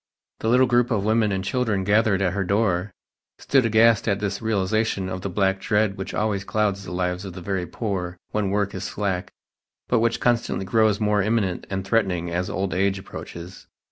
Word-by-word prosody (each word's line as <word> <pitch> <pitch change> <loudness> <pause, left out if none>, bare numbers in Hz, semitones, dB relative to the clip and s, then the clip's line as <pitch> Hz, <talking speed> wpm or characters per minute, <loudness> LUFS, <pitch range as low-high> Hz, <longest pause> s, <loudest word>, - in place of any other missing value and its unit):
The - - -3
little 125 +2 +5
group 120 -1 +2
of 105 -5 0
women 110 -1 +2
and 95 -1 -1
children 105 -1 0
gathered 100 -1 +3
at 90 -2 +1
her 100 0 -1
door 100 -1 0 0.5
stood 135 -4 +2
aghast 115 0 +4
at 100 -2 +2
this 100 -1 -3
realization 110 -2 0
of 95 0 -4
the 100 - -3
black 95 0 +1
dread 105 -1 +1
which 95 - -5
always 105 -2 0
clouds 100 -1 0
the 90 - -8
lives 90 +1 -2
of 95 -3 -7
the 90 - -8
very 90 -1 -2
poor 90 -3 -3
when 105 -2 0
work 100 0 0
is 95 - -5
slack, 95 -2 -2 0.6
but 120 - +2
which 115 0 +1
constantly 120 -5 0
grows 110 0 +2
more 105 -1 +2
imminent 100 -3 0
and 95 -1 -3
threatening 95 -6 0
as 90 +2 -1
old 95 0 -2
age 95 +1 +1
approaches. 90 -1 -9
100 Hz, 195 wpm, -24 LUFS, 95-110 Hz, 0.6 s, little